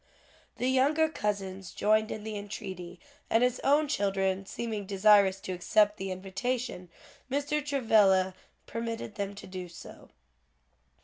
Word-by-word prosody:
The 250 Hz, -, 0 dB
younger 285 Hz, +5 st, +3 dB
cousins 195 Hz, -, -3 dB
joined 215 Hz, +1 st, +2 dB
in 215 Hz, -, -5 dB
the 220 Hz, 0 st, -5 dB
entreaty, 190 Hz, -4 st, -7 dB, 0.3 s
and 225 Hz, +2 st, +4 dB
his 250 Hz, 0 st, +1 dB
own 295 Hz, +2 st, +4 dB
children 195 Hz, -5 st, 0 dB
seeming 215 Hz, -4 st, -4 dB
desirous 200 Hz, -1 st, +5 dB
to -, -, -5 dB
accept 210 Hz, +3 st, +2 dB
the 195 Hz, -1 st, -4 dB
invitation, 195 Hz, +2 st, -3 dB, 0.4 s
Mr. 290 Hz, +2 st, 0 dB
Travilla 210 Hz, -9 st, +3 dB, 0.3 s
permitted 230 Hz, -1 st, -4 dB
them 200 Hz, -1 st, -4 dB
to 200 Hz, -, -10 dB
do 185 Hz, -1 st, -7 dB
so. 170 Hz, -, -12 dB
210 Hz, 130 wpm, -29 LUFS, 190-245 Hz, 0.4 s, desirous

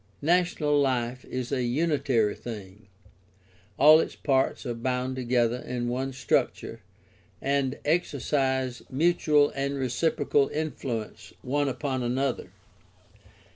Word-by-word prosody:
Nat'onal 160 Hz, -3 st, +2 dB
life 125 Hz, -2 st, -1 dB
is 130 Hz, 0 st, -5 dB
a 135 Hz, -2 st, 0 dB
unitary 130 Hz, -5 st, +1 dB
thing; 105 Hz, -3 st, -9 dB, 0.9 s
all 155 Hz, +3 st, +8 dB
its -, -, -2 dB
parts 135 Hz, 0 st, 0 dB
are 120 Hz, -, -2 dB
bound 125 Hz, +2 st, -2 dB
together 120 Hz, -1 st, +1 dB
in 125 Hz, -1 st, -4 dB
one 130 Hz, +2 st, -2 dB
structure 130 Hz, -1 st, -1 dB, 0.6 s
and 140 Hz, -1 st, 0 dB
exercise 135 Hz, -5 st, 0 dB
mutual 150 Hz, 0 st, +3 dB
and 140 Hz, 0 st, -2 dB
reciprocal 140 Hz, +2 st, +1 dB
influence 135 Hz, -8 st, -4 dB
one 145 Hz, +2 st, 0 dB
upon 130 Hz, 0 st, -2 dB
another. 125 Hz, -1 st, -1 dB
130 Hz, 105 wpm, -27 LUFS, 125-145 Hz, 0.9 s, all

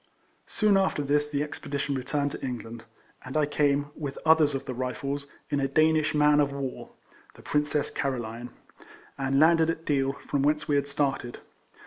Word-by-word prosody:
Soon 210 Hz, -3 st, +2 dB
after 190 Hz, -6 st, +1 dB
this 145 Hz, +1 st, +1 dB
the 145 Hz, 0 st, 0 dB
expedition 145 Hz, -1 st, -4 dB
returned 140 Hz, +2 st, -1 dB
to -, -, -5 dB
EIFLEMAN 135 Hz, -, -3 dB
HAERIS. 120 Hz, -3 st, -4 dB
23 115 Hz, -, -10 dB
England, 115 Hz, -1 st, -9 dB, 0.4 s
and 130 Hz, +4 st, -4 dB
I 150 Hz, -, +3 dB
came, 145 Hz, 0 st, +1 dB
with 145 Hz, -3 st, -5 dB
others 155 Hz, -3 st, +5 dB
of 135 Hz, -, -4 dB
the 130 Hz, -, -4 dB
Rifles, 135 Hz, +3 st, -3 dB, 0.2 s
in 145 Hz, -, +1 dB
a 135 Hz, -, +1 dB
Danish 155 Hz, +2 st, +2 dB
man 150 Hz, 0 st, +5 dB
of 145 Hz, -1 st, +2 dB
war 140 Hz, -2 st, -5 dB, 0.5 s
(the -, -, -15 dB
Princess 150 Hz, 0 st, 0 dB
Caroline), 120 Hz, -2 st, -3 dB, 0.7 s
and 135 Hz, 0 st, +1 dB
landed 165 Hz, +1 st, +5 dB
at 165 Hz, 0 st, -3 dB
Deal, 135 Hz, -2 st, +1 dB
from 140 Hz, -, 0 dB
whence 150 Hz, +2 st, +1 dB
we 145 Hz, -, +1 dB
had 140 Hz, 0 st, +1 dB
started. 140 Hz, -4 st, -2 dB
145 Hz, 185 wpm, -27 LUFS, 135-150 Hz, 0.7 s, others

